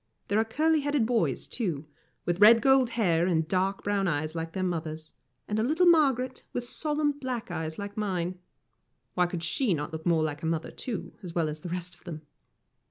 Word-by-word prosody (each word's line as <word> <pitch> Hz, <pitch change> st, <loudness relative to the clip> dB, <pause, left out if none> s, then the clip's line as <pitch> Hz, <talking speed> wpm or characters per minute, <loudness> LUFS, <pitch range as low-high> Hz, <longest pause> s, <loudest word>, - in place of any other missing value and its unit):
There 205 Hz, -, +3 dB
are -, -, +4 dB
curly 310 Hz, +7 st, +2 dB
headed 290 Hz, -4 st, +1 dB
boys, 230 Hz, -1 st, 0 dB
too, 170 Hz, -, -3 dB, 0.4 s
with 175 Hz, +1 st, 0 dB
red 225 Hz, +2 st, +9 dB
gold 265 Hz, +1 st, +4 dB
hair 175 Hz, -6 st, +3 dB
and 160 Hz, -3 st, +1 dB
dark 190 Hz, +2 st, 0 dB
brown 200 Hz, -1 st, +1 dB
eyes 155 Hz, -1 st, -1 dB
like 165 Hz, -1 st, -4 dB
their 190 Hz, -, -2 dB
mother's, 160 Hz, -3 st, -3 dB, 0.3 s
and 210 Hz, +1 st, -1 dB
a -, -, +2 dB
little 315 Hz, +8 st, +3 dB
Margaret, 270 Hz, -7 st, +3 dB
with 245 Hz, -, -2 dB
solemn 295 Hz, +3 st, 0 dB
black 255 Hz, -7 st, -5 dB
eyes 160 Hz, -2 st, -4 dB
like 200 Hz, 0 st, -6 dB
mine. 185 Hz, -4 st, -2 dB, 0.7 s
Why 180 Hz, +5 st, +2 dB
could 175 Hz, -1 st, -5 dB
she 190 Hz, +4 st, +1 dB
not 150 Hz, +1 st, -5 dB
look 160 Hz, -, -4 dB
like 155 Hz, -3 st, +1 dB
her 160 Hz, -, -2 dB
mother, 165 Hz, -1 st, -2 dB
too, 235 Hz, -5 st, -5 dB
as 175 Hz, -3 st, -8 dB
well 165 Hz, -2 st, +2 dB
as 150 Hz, 0 st, -5 dB
the 175 Hz, -, -7 dB
rest 180 Hz, 0 st, -3 dB
of -, -, -22 dB
them? 155 Hz, -2 st, -7 dB
185 Hz, 200 wpm, -28 LUFS, 165-245 Hz, 0.7 s, red